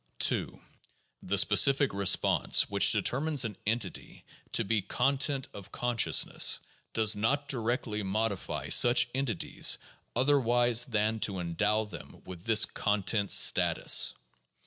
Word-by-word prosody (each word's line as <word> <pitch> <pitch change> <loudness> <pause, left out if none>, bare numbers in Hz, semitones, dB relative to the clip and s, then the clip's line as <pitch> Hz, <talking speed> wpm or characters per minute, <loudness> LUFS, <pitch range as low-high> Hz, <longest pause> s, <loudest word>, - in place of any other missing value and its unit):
2. - - 0 0.6
The 100 +2 -3
specific 135 +7 +2
response 100 -1 +1
which - - +3
determines 140 0 0
an 105 -3 -6
entity 115 +2 -5 0.3
to - - +1
be 110 +1 -1
content 135 +6 -1
of 100 -2 -12
consciousness, 120 -2 +1 0.3
does 110 -1 +2
not 140 +8 -2
directly 115 -4 -3
modify 100 0 -4
such 120 0 +4
entities 130 -7 -1 0.4
otherwise 120 -3 +2
than 110 -1 -1
to 100 -2 -2
endow 105 +5 -2
them 85 -7 -13
with 90 -1 -11
this 110 -1 +3
content 105 0 -2
status. - - +4
110 Hz, 115 wpm, -28 LUFS, 105-125 Hz, 0.6 s, such